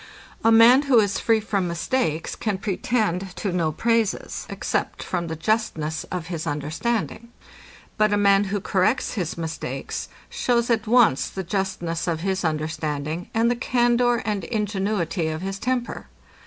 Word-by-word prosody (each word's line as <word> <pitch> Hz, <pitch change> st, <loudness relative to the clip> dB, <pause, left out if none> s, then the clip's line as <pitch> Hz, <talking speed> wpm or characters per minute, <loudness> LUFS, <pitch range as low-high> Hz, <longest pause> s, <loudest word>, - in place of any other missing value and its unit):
A 225 Hz, -, +5 dB
man, 230 Hz, +4 st, +8 dB
who 250 Hz, -, +6 dB
is 200 Hz, -2 st, +1 dB
free 225 Hz, -1 st, +3 dB
from 200 Hz, -4 st, -1 dB
mistakes, 170 Hz, -, -1 dB
can 210 Hz, -3 st, -2 dB
pretend 195 Hz, -2 st, -1 dB
to 200 Hz, -, -2 dB
no 170 Hz, -3 st, 0 dB
praises, 230 Hz, +4 st, 0 dB
except -, -, -2 dB
from 175 Hz, -2 st, -2 dB
the 160 Hz, -, -4 dB
justness 160 Hz, -4 st, -1 dB
of 180 Hz, -3 st, -5 dB
his 165 Hz, -2 st, -4 dB
understanding: 195 Hz, +11 st, -2 dB, 0.7 s
But 215 Hz, -1 st, +4 dB
a 205 Hz, -, +3 dB
man, 200 Hz, 0 st, +4 dB
who 200 Hz, +1 st, -1 dB
corrects 200 Hz, +7 st, +1 dB
his 180 Hz, -8 st, -3 dB
mistakes, 165 Hz, -1 st, -4 dB, 0.2 s
shews 240 Hz, -1 st, 0 dB
at 225 Hz, -1 st, +1 dB
once 230 Hz, -, +4 dB
the 190 Hz, -, -5 dB
justness 185 Hz, -3 st, -2 dB
of 165 Hz, -2 st, -1 dB
his 190 Hz, +1 st, -1 dB
understanding, 155 Hz, 0 st, -2 dB
and 230 Hz, +1 st, +3 dB
the -, -, +1 dB
candour 240 Hz, 0 st, +2 dB
and 205 Hz, -3 st, -1 dB
ingenuity 200 Hz, -5 st, -1 dB
of 160 Hz, +2 st, -3 dB
his 195 Hz, 0 st, -4 dB
temper. 250 Hz, 0 st, -2 dB
195 Hz, 155 wpm, -24 LUFS, 170-230 Hz, 0.7 s, man